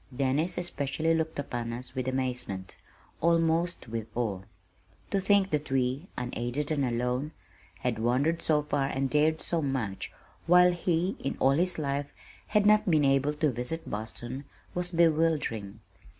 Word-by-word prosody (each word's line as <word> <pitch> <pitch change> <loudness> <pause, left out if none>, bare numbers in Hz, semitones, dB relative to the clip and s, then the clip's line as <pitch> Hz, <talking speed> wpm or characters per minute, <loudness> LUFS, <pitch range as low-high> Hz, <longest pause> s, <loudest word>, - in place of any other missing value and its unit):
Dennis 145 +6 +1
especially 160 -2 0
looked 160 0 -1
upon 120 -4 -3
us 125 +2 -6
with 130 -1 -3
amazement, 125 -8 -2 0.5
almost 165 0 +2
with 115 -1 -4
awe. 110 -6 -1 0.7
To 200 - +2
think 195 0 +3
that 150 -1 -1
we, 135 +5 0
unaided 125 +4 -2
and 145 -3 +1
alone, 125 +4 -1 0.5
had 120 -3 -1
wandered 135 +8 +1
so 150 -2 +2
far 145 -2 0
and 135 -1 -1
dared 155 +1 +3
so 170 -1 0
much, 130 -9 -2 0.4
while 180 +1 +7
he, 175 +2 0
in 135 - -3
all 135 - +4
his 175 +5 +2
life, 140 -1 -2 0.4
had 210 -1 +2
not 210 -2 +5
been 155 -4 +4
able 135 +2 +2
to 150 -1 +1
visit 125 +7 -4
Boston, 120 +5 -5 0.3
was 180 0 0
bewildering. 155 - +1
145 Hz, 150 wpm, -29 LUFS, 125-165 Hz, 0.7 s, while